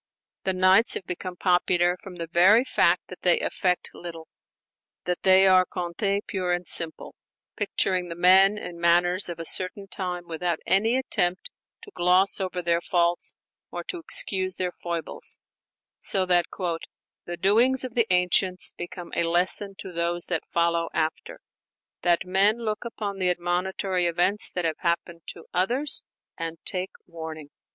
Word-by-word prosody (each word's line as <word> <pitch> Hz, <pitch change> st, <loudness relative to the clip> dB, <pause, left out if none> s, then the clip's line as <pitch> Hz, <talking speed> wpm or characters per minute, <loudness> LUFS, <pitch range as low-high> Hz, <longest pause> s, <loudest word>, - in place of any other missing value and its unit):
The 190 Hz, -, +1 dB
'Nights' 185 Hz, +5 st, +4 dB
have 190 Hz, -, -5 dB
become 180 Hz, +1 st, -6 dB
popular 180 Hz, -1 st, +2 dB
from 190 Hz, -2 st, -10 dB
the 170 Hz, -1 st, -5 dB
very 185 Hz, +8 st, +5 dB
fact 170 Hz, -, +2 dB
that 185 Hz, -, -10 dB
they 175 Hz, -1 st, +3 dB
affect 180 Hz, -1 st, -1 dB
little; 165 Hz, -2 st, -9 dB, 0.7 s
that 180 Hz, -1 st, -2 dB
they 190 Hz, 0 st, +6 dB
are 185 Hz, -1 st, +6 dB
contes 190 Hz, +3 st, -2 dB
pure 180 Hz, -2 st, -2 dB
and 175 Hz, 0 st, -2 dB
simple, 165 Hz, -1 st, 0 dB, 0.4 s
picturing 180 Hz, -2 st, 0 dB
the 170 Hz, -, -5 dB
men 190 Hz, +4 st, +5 dB
and 175 Hz, -4 st, -7 dB
the -, -, -12 dB
manners 175 Hz, +2 st, +3 dB
of 170 Hz, -, -5 dB
a 165 Hz, -, -6 dB
certain 185 Hz, +4 st, -1 dB
time 180 Hz, -3 st, -5 dB
without 170 Hz, 0 st, -2 dB
any 220 Hz, +6 st, +3 dB
attempt 185 Hz, -, -1 dB, 0.3 s
to 420 Hz, -, -12 dB
gloss 185 Hz, -, +2 dB
over 185 Hz, -2 st, -3 dB
their 170 Hz, 0 st, +1 dB
faults 175 Hz, -1 st, 0 dB, 0.3 s
or -, -, -6 dB
to 360 Hz, -, -5 dB
excuse 190 Hz, -, 0 dB
their 180 Hz, -1 st, -2 dB
foibles: 170 Hz, -2 st, -3 dB, 0.6 s
so 190 Hz, -2 st, +1 dB
that 175 Hz, -1 st, +3 dB, 0.8 s
"the 175 Hz, 0 st, -6 dB
doings 235 Hz, +9 st, +3 dB
of 255 Hz, -2 st, -6 dB
the 230 Hz, -4 st, +1 dB
ancients 180 Hz, 0 st, +2 dB
become 175 Hz, 0 st, -9 dB
a -, -, +1 dB
lesson 180 Hz, +4 st, 0 dB
to 190 Hz, -, -8 dB
those 170 Hz, 0 st, -1 dB
that 165 Hz, -3 st, -3 dB
follow 170 Hz, 0 st, +1 dB
after, 155 Hz, -1 st, -3 dB, 0.6 s
that 175 Hz, +1 st, +2 dB
men 195 Hz, +4 st, +3 dB
look 215 Hz, -2 st, -3 dB
upon 205 Hz, -4 st, -5 dB
the 185 Hz, -1 st, +2 dB
admonitory 180 Hz, +1 st, -1 dB
events 180 Hz, +5 st, +3 dB
that 180 Hz, -2 st, -2 dB
have 160 Hz, -1 st, -1 dB
happened 170 Hz, 0 st, -2 dB
to 165 Hz, -, -9 dB
others 245 Hz, +11 st, +1 dB, 0.4 s
and 165 Hz, 0 st, -4 dB
take 185 Hz, 0 st, -2 dB, 0.2 s
warning." 160 Hz, -3 st, -9 dB
180 Hz, 160 wpm, -25 LUFS, 170-190 Hz, 0.8 s, they